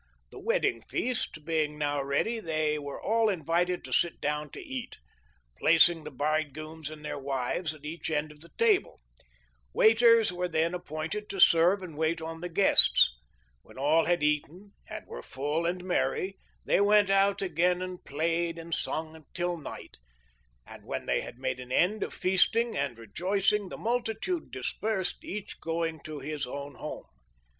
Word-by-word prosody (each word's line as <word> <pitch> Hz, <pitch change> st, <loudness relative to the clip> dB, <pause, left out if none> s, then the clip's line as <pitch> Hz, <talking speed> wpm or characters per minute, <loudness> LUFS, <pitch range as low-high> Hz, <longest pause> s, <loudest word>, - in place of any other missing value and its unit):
The -, -, -10 dB
wedding 115 Hz, -1 st, 0 dB
feast 195 Hz, -, -2 dB
being 155 Hz, -2 st, 0 dB
now 145 Hz, -1 st, 0 dB
ready 140 Hz, +12 st, 0 dB
they 155 Hz, -4 st, -1 dB
were 145 Hz, -1 st, -6 dB
all 225 Hz, 0 st, +2 dB
invited 175 Hz, 0 st, 0 dB
to -, -, -6 dB
sit 170 Hz, -, +1 dB
down 150 Hz, +1 st, -2 dB
to -, -, -10 dB
eat, 265 Hz, -, -6 dB, 0.6 s
placing 165 Hz, 0 st, +5 dB
the -, -, -5 dB
bridegrooms 155 Hz, +2 st, -3 dB
and 155 Hz, -1 st, -10 dB
their 145 Hz, -1 st, -4 dB
wives 140 Hz, +4 st, -2 dB
at 150 Hz, -1 st, -15 dB
each 165 Hz, +3 st, -5 dB
end 150 Hz, -1 st, -1 dB
of 150 Hz, -, -16 dB
the 170 Hz, -, -13 dB
table 445 Hz, -4 st, +2 dB, 0.7 s
Waiters 225 Hz, -2 st, +5 dB
were 180 Hz, 0 st, -2 dB
then 165 Hz, 0 st, 0 dB
appointed 175 Hz, +4 st, -5 dB
to 195 Hz, -, -5 dB
serve 175 Hz, +3 st, +5 dB
and 165 Hz, -4 st, -8 dB
wait 160 Hz, +2 st, 0 dB
on 165 Hz, 0 st, -7 dB
the 180 Hz, -, -4 dB
guests. 175 Hz, -, +6 dB, 0.5 s
When -, -, -17 dB
all 155 Hz, +4 st, +3 dB
had 175 Hz, -3 st, +1 dB
eaten 150 Hz, +7 st, -1 dB, 0.2 s
and -, -, -7 dB
were -, -, -8 dB
full 150 Hz, -, -2 dB
and 180 Hz, +1 st, -2 dB
merry 190 Hz, +1 st, -1 dB, 0.3 s
they -, -, +3 dB
went 205 Hz, -1 st, +4 dB
out 195 Hz, 0 st, +3 dB
again 180 Hz, +1 st, +1 dB
and 185 Hz, -1 st, -7 dB
played 165 Hz, +3 st, -1 dB
and 165 Hz, 0 st, -7 dB
sung 160 Hz, 0 st, -3 dB
till 175 Hz, 0 st, -1 dB
night, 160 Hz, -, -9 dB, 0.7 s
and -, -, -12 dB
when -, -, -5 dB
they -, -, +1 dB
had -, -, -9 dB
made 130 Hz, -, -3 dB
an 125 Hz, 0 st, -9 dB
end 200 Hz, +10 st, +2 dB
of -, -, -2 dB
feasting 225 Hz, +5 st, +2 dB
and 140 Hz, -4 st, -2 dB
rejoicing 190 Hz, -, 0 dB
the -, -, -7 dB
multitude 240 Hz, -, -2 dB
dispersed, 190 Hz, -, -3 dB
each 205 Hz, +1 st, -6 dB
going 165 Hz, -1 st, -2 dB
to 155 Hz, -1 st, -6 dB
his 145 Hz, -1 st, -4 dB
own 140 Hz, +2 st, -6 dB
home. -, -, -7 dB
165 Hz, 165 wpm, -29 LUFS, 150-190 Hz, 0.7 s, guests